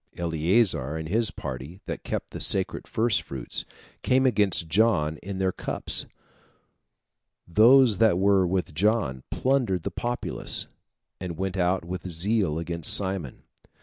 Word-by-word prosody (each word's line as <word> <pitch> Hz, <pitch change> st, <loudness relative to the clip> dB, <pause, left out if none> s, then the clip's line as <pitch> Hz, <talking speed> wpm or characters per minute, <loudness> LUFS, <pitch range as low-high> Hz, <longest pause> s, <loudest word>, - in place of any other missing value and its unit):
Eleazar 85 Hz, -, +1 dB
and 80 Hz, 0 st, -6 dB
his 110 Hz, +2 st, +2 dB
party, 70 Hz, +2 st, -7 dB
that -, -, -6 dB
kept -, -, -4 dB
the -, -, -6 dB
sacred -, -, 0 dB
first 115 Hz, 0 st, +1 dB
fruits, 65 Hz, -3 st, -6 dB, 0.4 s
came 130 Hz, +1 st, +2 dB
against 105 Hz, -8 st, +2 dB
John 80 Hz, -4 st, +2 dB
in 95 Hz, +3 st, -7 dB
their 95 Hz, 0 st, +1 dB
cups. -, -, -1 dB, 1.4 s
Those 115 Hz, +4 st, +5 dB
that 110 Hz, -6 st, +4 dB
were 95 Hz, -1 st, +3 dB
with 90 Hz, -2 st, -2 dB
John 90 Hz, -, +1 dB
plundered 125 Hz, -10 st, 0 dB
the 100 Hz, -, -3 dB
populace, 120 Hz, +6 st, -2 dB, 0.5 s
and 90 Hz, -3 st, -6 dB
went 95 Hz, +1 st, -3 dB
out 90 Hz, -1 st, 0 dB
with 90 Hz, +1 st, -5 dB
zeal 90 Hz, -1 st, 0 dB
against 85 Hz, -1 st, 0 dB
Simon. 95 Hz, -9 st, 0 dB
95 Hz, 135 wpm, -26 LUFS, 80-110 Hz, 1.4 s, Those